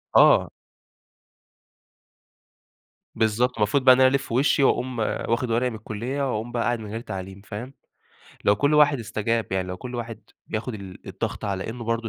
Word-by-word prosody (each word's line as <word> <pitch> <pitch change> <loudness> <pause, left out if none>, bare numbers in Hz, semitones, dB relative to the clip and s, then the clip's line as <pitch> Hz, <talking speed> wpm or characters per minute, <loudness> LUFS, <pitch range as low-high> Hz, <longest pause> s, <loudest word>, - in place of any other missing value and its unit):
آه. - - +6 2.7
بالضبط. 115 +3 +1
المفروض 105 +6 +2
بقى 130 -1 +9
إن - - -1
أنا 130 0 +7
ألِف 140 -2 -3
وشي 135 +4 +3
وأقوم 130 -2 +1
واخد 115 +2 -1
ورقي 120 +2 +2
من 115 - -7
الكُلية 115 +6 -4
وأقوم 115 +1 -3
بقى 120 -1 -1
قاعد 120 0 0
من 110 -1 -8
غير 110 - -3
تعليم، 95 -2 -7
فاهم؟ 115 +6 -8 0.7
لو 100 - +4
كل 145 +7 +2
واحد 145 -2 +5
استجاب 115 0 -2
يعني 95 -1 -1
لو 90 - -4
كل 125 +6 -8
واحد 115 -2 -5 0.3
بياخد 115 +2 -4
ال 95 -3 -10
الضغط - - -4
على 95 -2 -3
إنه 120 +1 -7
برضه 115 0 -1
115 Hz, 170 wpm, -24 LUFS, 105-125 Hz, 2.7 s, بقى